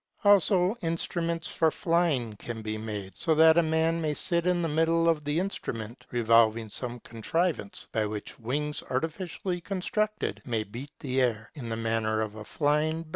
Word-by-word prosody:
Also 200 -1 +5
instruments 165 0 -1
for 160 - +2
flying 155 -10 +1
can 115 0 -6
be 110 0 -3
made, 105 -3 -5
so 160 -2 +1
that 160 +1 +7
a - - +6
man 160 +1 +1
may 155 -2 0
sit 170 +2 0
in 175 -1 +2
the - - +1
middle 165 +2 +2
of 160 -2 +2
the 145 +1 -1
instrument, 120 - -4
revolving 115 -1 +3
some 120 +3 -4
contriv 165 +10 -1
ance 100 0 -8
by 110 -1 0
which 105 -1 -7
wings 145 +6 -2
artificially 175 +5 -2
constructed 210 +3 -2
may 115 -3 -1
beat 120 +7 -8
the 130 -2 0
air, 115 -3 0
in 125 -7 -7
the 115 - -1
manner 110 -1 0
of 110 -1 -2
a 110 - -9
bird 105 - -9
flying. 155 +2 +1
150 Hz, 180 wpm, -28 LUFS, 115-165 Hz, -, that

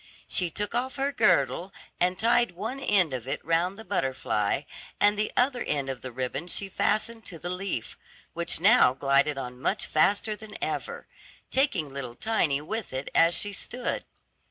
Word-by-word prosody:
She 180 -2 +1
took 205 +6 -4
off 255 +3 -1
her 275 +1 0
girdle 205 -6 +2 0.3
and 180 +1 +2
tied 235 -2 +3
one 220 +9 -5
end 185 - +3
of 125 -1 -5
it - - -2
round 170 +4 +1
the 220 - -10
butterfly, 130 - 0 0.4
and 205 0 +5
the 210 +1 -1
other 250 0 +2
end 140 -2 -1
of 130 - -8
the 130 - -6
ribbon 130 +6 -4
she 195 +2 -1
fastened 220 +4 0
to 175 - -6
the 175 +2 -4
leaf, 180 - -4 0.3
which 170 0 +1
now 200 - +6
glided 140 +1 +2
on 125 -1 -6
much - - 0
faster 205 +7 +2
than 210 0 -11
ever, 475 0 -4 0.5
taking 185 - +1
little 125 -4 -5
Tiny 165 - +1
with 215 +2 -5
it 130 +1 -4
as 165 +1 +5
she 205 -1 -1
stood. 245 +4 -3
180 Hz, 175 wpm, -27 LUFS, 140-220 Hz, 0.5 s, now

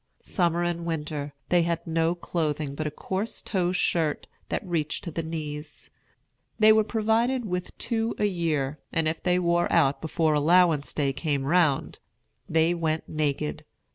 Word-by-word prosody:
Summer 175 -2 +1
and 170 -1 -1
winter, 150 -3 -4
they 175 -1 +4
had 170 0 -1
no 165 +1 +1
clothing 155 -4 -2
but 155 +2 -3
a - - 0
coarse 190 +8 -4
tow 180 -4 0
shirt 165 -4 0 0.2
that - - -2
reached 165 -4 -2
to 170 - -5
the 165 - -2
knees. 155 -2 -6 0.7
They 220 -1 +7
were 220 0 +4
provided 230 +3 +1
with 180 -2 -4
two 225 -1 -1
a 210 - +1
year; 155 -7 -1
and 165 -1 0
if 160 +1 -2
they 180 0 +2
wore 175 -1 +1
out 145 -5 +3
before 160 0 +1
allowance 160 0 +4
day 140 -2 +1
came 140 0 -1
round, 160 -2 +2 0.5
they 160 +2 +3
went 160 -2 -1
naked. 140 - -2
165 Hz, 160 wpm, -26 LUFS, 150-180 Hz, 0.7 s, They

